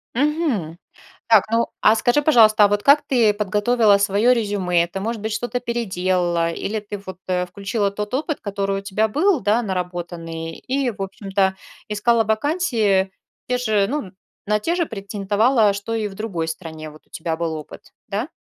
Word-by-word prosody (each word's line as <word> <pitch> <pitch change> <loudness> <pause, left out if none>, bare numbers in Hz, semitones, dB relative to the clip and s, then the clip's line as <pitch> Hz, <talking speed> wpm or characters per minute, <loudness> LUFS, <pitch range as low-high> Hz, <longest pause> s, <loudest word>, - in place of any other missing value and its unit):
Мгм. 260 - 0 0.5
Так, 220 -3 +6
ну, 230 0 +2
а 220 - +6
скажи, 245 +6 +2
пожалуйста, 220 -7 +6
а - - +5
вот 205 0 0
как 285 +2 +6
ты 230 -5 +3
подготовила 210 +1 +3
своё 200 +5 +3
резюме? 190 -7 +1
Ты, 190 +3 -6
может 220 +1 -3
быть, 220 0 -3
что-то 240 +3 -2
переделала? 185 -7 0
Или 210 +6 -3
ты, 205 0 -7
вот, 190 -1 -7
э, 180 -1 0
включила 200 +2 -2
тот 210 +3 -5
опыт, 300 +2 -1
который 195 -1 -2
у - - -8
тебя 210 +2 0
был, 320 - +2
да, 215 +3 +2
наработанный, 175 -4 -4
и, 270 0 0
в 200 - -10
общем-то, 195 0 -1 0.3
искала 225 +2 +2
вакансии 220 - +1 0.4
те 250 - +1
же, 215 -5 +1
ну, 265 -9 -3 0.4
на 210 0 +2
те 330 +11 -1
же 345 -2 +1
претендовала, 205 +2 +1
что 200 +3 -5
и 220 -2 -1
в 195 - -10
другой 190 -6 -3
стране, 160 -2 -7
вот, 155 0 -17
у - - -36
тебя 160 0 -3
был 165 -1 -2
опыт, 155 -1 -10
да? - - -3
205 Hz, 175 wpm, -21 LUFS, 190-235 Hz, 0.5 s, Так